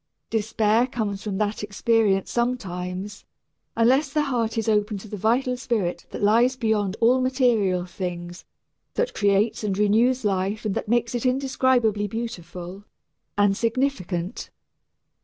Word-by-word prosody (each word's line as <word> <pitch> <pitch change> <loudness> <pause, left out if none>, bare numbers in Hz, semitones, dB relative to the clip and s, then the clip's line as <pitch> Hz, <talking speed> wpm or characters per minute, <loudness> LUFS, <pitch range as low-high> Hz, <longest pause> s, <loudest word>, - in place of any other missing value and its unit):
Despair 220 +1 +2
comes 210 -6 -3
from 205 -3 -3
that 210 0 -1
experience 210 -1 +1
sometimes, 200 -5 -3 0.5
unless 265 +5 +3
the 300 +1 +1
heart 235 -5 -1
is 225 - -1
open 210 -1 +1
to 200 - -10
the 210 - -6
vital 240 +5 +1
spirit 220 -8 -2
that - - -6
lies 235 +5 +4
beyond 215 -5 0
all 245 +3 +4
material 235 -9 +2
things, 175 -1 -6 0.5
that 485 +1 0
creates 205 +2 +1
and 195 -2 -1
renews 225 +4 +3
life 200 +3 -1
and 210 - 0
that - - -3
makes 235 0 +1
it 240 - -2
indescribably 255 -5 +1
beautiful 185 -4 -6 0.5
and 205 -1 +3
significant. 220 -7 -2
215 Hz, 135 wpm, -24 LUFS, 195-240 Hz, 0.5 s, lies